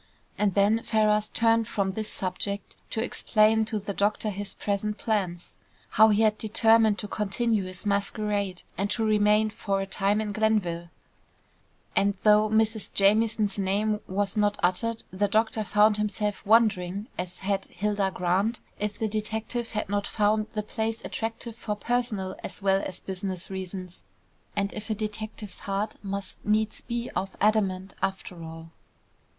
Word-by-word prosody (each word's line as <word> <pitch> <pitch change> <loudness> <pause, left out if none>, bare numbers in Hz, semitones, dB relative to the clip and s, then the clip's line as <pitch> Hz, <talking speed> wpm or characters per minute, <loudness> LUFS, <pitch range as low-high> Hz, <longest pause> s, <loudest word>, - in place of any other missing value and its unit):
And 205 -3 +1
then 205 +3 +4
Ferrars 215 -1 +2
turned 225 -1 +2
from 195 -2 0
this 215 +2 -3
subject 195 +1 -3
to 225 - -1
explain 220 -2 +3
to 215 0 -2
the 200 0 -4
doctor 210 +2 +1
his 200 0 -5
present 210 +1 -2
plans. 200 -10 -2 0.3
How 220 +1 +7
he 210 +1 +3
had 215 -1 +3
determined 220 0 +4
to 210 - -4
continue 210 0 0
his 185 +2 -9
masquerade, 200 -2 0 0.2
and 200 +1 +1
to 225 +2 0
remain 215 0 +3
for 195 -2 -1
a 195 - -1
time 200 +2 +1
in 215 -1 -2
Glenville; 200 -6 0 1.1
and, 200 0 +3
though 215 0 +5
Mrs. 220 0 +1
Jamieson's 210 0 +3
name 210 +2 +1
was 195 +1 -1
not 205 -1 +2
uttered, 225 +6 +1
the 205 +2 +1
doctor 220 +1 +1
found 210 +1 +4
himself 210 0 -1
wondering, 205 -3 +3
as 180 0 -5
had 195 0 0
Hilda 205 +1 -1
Grant, 190 +6 0 0.2
if 210 0 -2
the 220 - 0
detective 220 +2 -2
had 215 - -1
not 205 +1 -1
found 215 0 +1
the 210 -1 -2
place 220 +1 -3
attractive 225 0 -4
for 215 -3 -3
personal, 215 -4 -1
as - - -6
well 195 -1 +2
as 185 - -5
business 190 -1 -4
reasons; 185 -1 -6 0.5
and 200 0 -1
if 210 0 -7
a 215 - +1
detective's 215 -1 -5
heart 200 +2 -1
must 200 -1 -5
needs 215 0 +1
be 235 0 -4
of 195 0 -3
adamant 195 -3 +1
after 190 -3 -3
all. 165 0 -9
210 Hz, 155 wpm, -27 LUFS, 195-220 Hz, 1.1 s, How